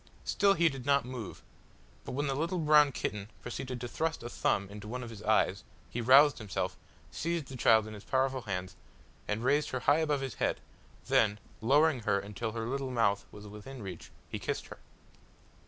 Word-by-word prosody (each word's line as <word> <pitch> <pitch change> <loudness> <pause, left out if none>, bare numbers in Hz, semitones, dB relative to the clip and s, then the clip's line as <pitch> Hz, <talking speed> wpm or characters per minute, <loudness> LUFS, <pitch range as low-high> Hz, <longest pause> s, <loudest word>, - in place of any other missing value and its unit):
Still 200 -1 +3
he 170 0 +4
did 135 -5 -3
not 140 -2 +3
move, 125 -5 -7 0.6
but - - -5
when 145 +3 -1
the 140 - 0
little 165 +6 -1
brown 150 -3 +5
kitten 105 -4 -4
proceeded 125 +1 -5
to 120 - -3
thrust 160 +2 -2
a 120 - -5
thumb 100 0 0
into 105 +1 -9
one 125 +3 -4
of 120 - -7
his 110 -2 -10
eyes, 105 -2 +2 0.3
he 120 - -2
roused 135 +5 +6
himself, 105 -4 -3 0.4
seized 165 -3 -2
the 135 - -7
child 110 -3 +5
in 110 - -8
his 105 -1 -10
powerful 130 +2 0
hands, 95 -4 -4 0.5
and 105 +2 -2
raised 145 +4 +2
her 130 - -3
high 145 +5 +4
above 150 -3 +1
his 135 -4 -3
head; - - +1 0.5
then, 105 -2 +3 0.2
lowering 145 +4 +4
her 110 -3 +1
until 105 +3 -5
her 115 -1 -3
little 135 +2 -2
mouth 110 -5 +1
was 105 0 -11
within 105 +4 -9
reach, 90 -4 -8 0.2
he - - -5
kissed - - -3
her. - - -10
125 Hz, 195 wpm, -31 LUFS, 105-140 Hz, 0.6 s, roused